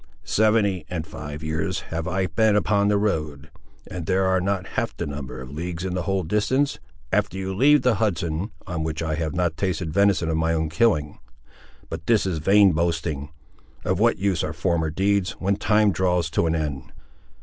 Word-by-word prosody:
"Seventy 105 Hz, -5 st, +2 dB
and 85 Hz, -3 st, -3 dB
five 75 Hz, -1 st, -8 dB
years 80 Hz, +4 st, -2 dB
have 80 Hz, 0 st, -3 dB
I 95 Hz, 0 st, 0 dB
been 105 Hz, +5 st, +2 dB
upon 100 Hz, 0 st, +2 dB
the 105 Hz, 0 st, +3 dB
road; 75 Hz, -7 st, -2 dB, 0.3 s
and 85 Hz, -3 st, -7 dB
there 95 Hz, 0 st, +2 dB
are 95 Hz, 0 st, +2 dB
not 95 Hz, -1 st, -2 dB
half -, -, -3 dB
that -, -, -2 dB
number 70 Hz, -3 st, -6 dB
of 65 Hz, +1 st, -9 dB
leagues 85 Hz, +3 st, -4 dB
in 95 Hz, -, -2 dB
the 90 Hz, -, -1 dB
whole 95 Hz, 0 st, -1 dB
distance, 105 Hz, -, 0 dB, 0.3 s
after -, -, +1 dB
you 95 Hz, 0 st, -3 dB
leave 145 Hz, +9 st, +4 dB
the 125 Hz, -, +4 dB
Hudson, 85 Hz, -2 st, -1 dB, 0.2 s
on 85 Hz, -4 st, -3 dB
which 80 Hz, 0 st, -3 dB
I 80 Hz, -1 st, -1 dB
have 80 Hz, +1 st, -2 dB
not 85 Hz, -3 st, 0 dB
tasted 85 Hz, -4 st, -2 dB
venison 100 Hz, -4 st, +3 dB
of 80 Hz, 0 st, 0 dB
my 80 Hz, +1 st, +1 dB
own 80 Hz, -1 st, -1 dB
killing. 80 Hz, -4 st, +1 dB, 0.7 s
But 80 Hz, -, -7 dB
this 115 Hz, -4 st, +3 dB
is 90 Hz, -4 st, -1 dB
vain 100 Hz, +4 st, +5 dB
boasting. 80 Hz, -3 st, -1 dB, 0.6 s
Of -, -, 0 dB
what -, -, +3 dB
use 95 Hz, -2 st, 0 dB
are 75 Hz, -, -3 dB
former 85 Hz, -1 st, 0 dB
deeds, 95 Hz, +3 st, +1 dB
when 100 Hz, +1 st, -1 dB
time 105 Hz, 0 st, +3 dB
draws 90 Hz, -2 st, 0 dB
to 85 Hz, -, +1 dB
an 80 Hz, -, +1 dB
end?" 75 Hz, -4 st, -4 dB
90 Hz, 195 wpm, -24 LUFS, 80-100 Hz, 0.7 s, vain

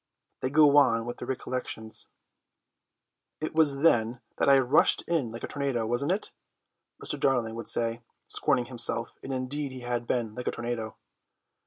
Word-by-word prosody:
They 130 Hz, -, -2 dB
go 145 Hz, 0 st, +5 dB
on 115 Hz, -5 st, +4 dB
with 120 Hz, -, -6 dB
their -, -, -7 dB
recollections. 125 Hz, -4 st, -3 dB, 1.3 s
"It 155 Hz, -, -3 dB
was 145 Hz, -4 st, +3 dB
then 120 Hz, -6 st, +2 dB, 0.2 s
that -, -, +2 dB
I 140 Hz, -, +7 dB
rushed 135 Hz, +2 st, +3 dB
in 155 Hz, -9 st, -1 dB
like 115 Hz, -, -9 dB
a -, -, -3 dB
tornado, 135 Hz, -5 st, -2 dB
wasn't 120 Hz, +8 st, -1 dB
it?" 195 Hz, +3 st, -2 dB, 0.7 s
Mr. -, -, -4 dB
Darling 120 Hz, -5 st, +1 dB
would 115 Hz, +1 st, -7 dB
say, 115 Hz, 0 st, 0 dB, 0.2 s
scorning 125 Hz, -, 0 dB
himself; 120 Hz, -1 st, +4 dB
and 135 Hz, -, -7 dB
indeed 135 Hz, +2 st, -3 dB
he 130 Hz, -, -8 dB
had 120 Hz, -1 st, -3 dB
been 115 Hz, -4 st, -1 dB
like 125 Hz, +2 st, -7 dB
a -, -, +1 dB
tornado. 120 Hz, -2 st, -5 dB
125 Hz, 165 wpm, -27 LUFS, 115-140 Hz, 1.3 s, I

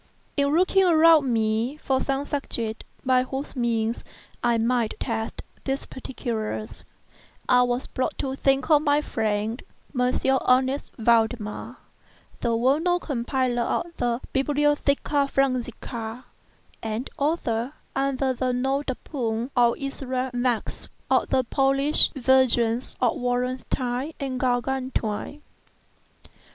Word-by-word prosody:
In 280 Hz, -1 st, +2 dB
looking 380 Hz, +2 st, +4 dB
around 320 Hz, -5 st, +5 dB
me 225 Hz, +4 st, 0 dB
for 265 Hz, -3 st, 0 dB
some 275 Hz, +1 st, -1 dB
subject 235 Hz, -6 st, -3 dB, 0.2 s
by 255 Hz, -1 st, +4 dB
whose 265 Hz, +3 st, -5 dB
means 230 Hz, -2 st, 0 dB, 0.4 s
I 240 Hz, -1 st, +3 dB
might 230 Hz, 0 st, 0 dB
test 225 Hz, -2 st, -3 dB, 0.2 s
these 270 Hz, 0 st, -2 dB
particulars, 215 Hz, -, -5 dB, 0.6 s
I 250 Hz, 0 st, +5 dB
was 245 Hz, +1 st, 0 dB
brought 255 Hz, -, -3 dB
to 265 Hz, -1 st, -2 dB
think 270 Hz, +2 st, +1 dB
of 295 Hz, -1 st, +6 dB
my 290 Hz, 0 st, +3 dB
friend, 220 Hz, -2 st, -1 dB, 0.3 s
M. 250 Hz, -1 st, +2 dB, 0.4 s
Ernest 260 Hz, +2 st, +2 dB
Valdemar, 225 Hz, -2 st, +1 dB, 0.6 s
the 235 Hz, -1 st, 0 dB
well 260 Hz, +6 st, +3 dB
known 355 Hz, +1 st, +1 dB
compiler 255 Hz, -3 st, -1 dB
of 335 Hz, +8 st, -2 dB
the 240 Hz, 0 st, 0 dB
"Bibliotheca 290 Hz, 0 st, +1 dB
Forensica," 245 Hz, -3 st, -2 dB, 0.6 s
and 225 Hz, +3 st, -3 dB
author 275 Hz, -4 st, 0 dB, 0.2 s
(under 270 Hz, -1 st, +1 dB
the 255 Hz, 0 st, -1 dB
nom 265 Hz, +3 st, 0 dB
de 265 Hz, -3 st, -3 dB
plume 240 Hz, -3 st, -3 dB
of 240 Hz, -2 st, +4 dB
Issachar 260 Hz, -2 st, -3 dB
Marx) 245 Hz, -2 st, -1 dB, 0.2 s
of -, -, +3 dB
the 260 Hz, -, +2 dB
Polish 275 Hz, +4 st, +3 dB
versions 250 Hz, -2 st, +2 dB
of 245 Hz, -3 st, +2 dB
"Wallenstein" 250 Hz, +2 st, -2 dB
and 265 Hz, -3 st, -3 dB
"Gargantua." 250 Hz, -3 st, -1 dB
M. 300 Hz, -, -17 dB
255 Hz, 120 wpm, -25 LUFS, 235-275 Hz, 0.6 s, of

